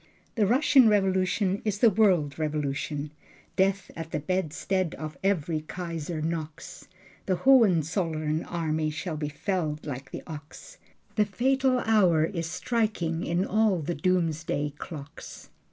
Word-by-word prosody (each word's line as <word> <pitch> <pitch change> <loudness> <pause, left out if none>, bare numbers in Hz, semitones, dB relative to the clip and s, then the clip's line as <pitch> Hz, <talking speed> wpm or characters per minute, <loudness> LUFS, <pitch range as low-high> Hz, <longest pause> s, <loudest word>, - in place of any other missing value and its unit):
The 215 -4 +2
Russian 260 0 +5
Revolution 190 -1 +1
is 210 -2 -1
the 225 +1 +5
world 180 -9 +2
revolution. 150 -1 -2 0.4
Death 195 0 +1
at 165 -1 -6
the - - -2
bedstead 185 +2 -1
of 155 -1 -6
every 165 -5 0
Kaiser 165 -1 -5
knocks. 160 -1 -5 0.4
The 185 - +2
Hohenzollern 165 - +3
army 160 -2 -1
shall 155 +2 -4
be 150 -1 -3
felled 155 -2 -2
like 135 -2 -6
the - - -7
ox. 155 -2 -10 0.4
The 210 - +4
fatal 260 +4 +1
hour 185 -8 +4
is 165 -2 -3
striking 210 -8 -1
in 175 +3 0
all 215 -2 +2
the 170 +1 -3
doomsday 165 -5 0
clocks. 145 -3 -9
170 Hz, 130 wpm, -27 LUFS, 155-195 Hz, 0.4 s, Russian